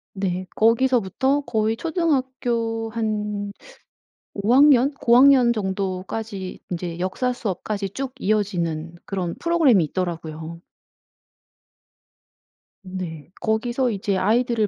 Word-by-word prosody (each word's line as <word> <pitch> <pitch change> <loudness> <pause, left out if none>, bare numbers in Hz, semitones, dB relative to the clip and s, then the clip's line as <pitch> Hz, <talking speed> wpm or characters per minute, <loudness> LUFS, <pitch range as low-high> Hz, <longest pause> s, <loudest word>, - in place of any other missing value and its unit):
네, 185 -1 -2
거기서부터 255 +3 +2
거의 220 -4 0
초등학교 255 -8 -1
한 210 -2 -2 0.8
5 200 +3 0
학년, 275 0 +6
고학년 250 -1 +5
정도까지 190 0 -4
인제 170 -1 -4
역사 190 +8 -1
수업까지 200 -3 -3
쭉 265 +4 -5
이어지는 175 -7 -1
그런 180 -4 -3
프로그램이 320 - +3
있더라고요. 165 -1 -5 2.2
네. 180 -5 -7
거기서 240 +4 0
이제 200 -1 -1
아이들을 225 +2 +2
215 Hz, 235 characters per minute, -23 LUFS, 185-245 Hz, 2.2 s, 학년